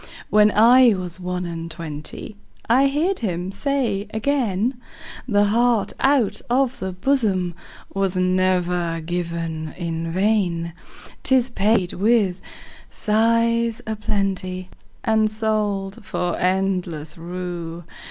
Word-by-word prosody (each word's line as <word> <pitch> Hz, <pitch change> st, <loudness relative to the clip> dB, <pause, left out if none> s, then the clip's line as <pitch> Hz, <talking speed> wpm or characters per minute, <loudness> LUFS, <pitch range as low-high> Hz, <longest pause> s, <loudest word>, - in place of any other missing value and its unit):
When 210 Hz, 0 st, +6 dB
I 235 Hz, +2 st, +6 dB
was 180 Hz, -1 st, -4 dB
one 180 Hz, 0 st, -3 dB
and 165 Hz, -1 st, -5 dB
twentyI 155 Hz, -2 st, -5 dB, 0.6 s
heard 340 Hz, +7 st, 0 dB
him 180 Hz, -4 st, -2 dB
say 220 Hz, -3 st, -1 dB
again,'The 235 Hz, -2 st, -1 dB
heart 230 Hz, 0 st, +2 dB
out 270 Hz, -6 st, +2 dB
of 260 Hz, +1 st, +1 dB
the 190 Hz, 0 st, -3 dB
bosomWas 190 Hz, -3 st, -1 dB
never 180 Hz, -2 st, +1 dB
given 165 Hz, -2 st, -4 dB
in 165 Hz, -2 st, -3 dB
vain;'Tis 190 Hz, +6 st, -1 dB
paid 200 Hz, -4 st, +1 dB
with 200 Hz, -3 st, +2 dB, 0.5 s
sighs 230 Hz, +1 st, +1 dB
a 220 Hz, -, -3 dB
plentyAnd 200 Hz, +2 st, -2 dB
sold 210 Hz, -3 st, -1 dB
for 180 Hz, -4 st, -2 dB
endless 180 Hz, -5 st, -1 dB
rue. 175 Hz, -1 st, -6 dB
195 Hz, 95 wpm, -22 LUFS, 175-225 Hz, 0.6 s, When